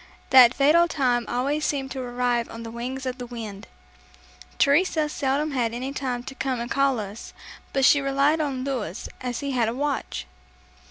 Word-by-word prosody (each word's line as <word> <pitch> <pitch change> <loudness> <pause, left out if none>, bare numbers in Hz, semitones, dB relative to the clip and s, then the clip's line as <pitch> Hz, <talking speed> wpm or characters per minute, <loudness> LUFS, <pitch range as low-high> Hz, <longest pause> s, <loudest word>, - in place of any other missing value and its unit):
That 255 -2 +8
fatal 315 +5 +5
time 250 -7 +1
always 280 +5 -1
seemed 270 -3 -1
to 265 - -4
arrive 245 -1 -1
on 230 0 -8
the 225 - -7
wings 255 +3 -5
of 255 0 -4
the 245 - -6
wind. 225 -4 -8 0.9
Teresa 310 +1 +3
seldom 290 +1 -1
had 235 -4 -1
any 260 +3 -4
time 250 -3 -3
to 265 +1 -8
come 265 -2 -2
and 235 0 -5
call 275 -3 +2
us, 205 +1 -7 0.4
but 270 -1 +2
she 285 0 +6
relied 275 +3 +2
on 270 -4 -2
Louis, 240 -8 -4
as 250 0 -3
he 280 -1 -3
had 240 -4 +1
a 230 - -4
watch. 275 - -2
260 Hz, 180 wpm, -25 LUFS, 240-280 Hz, 0.9 s, That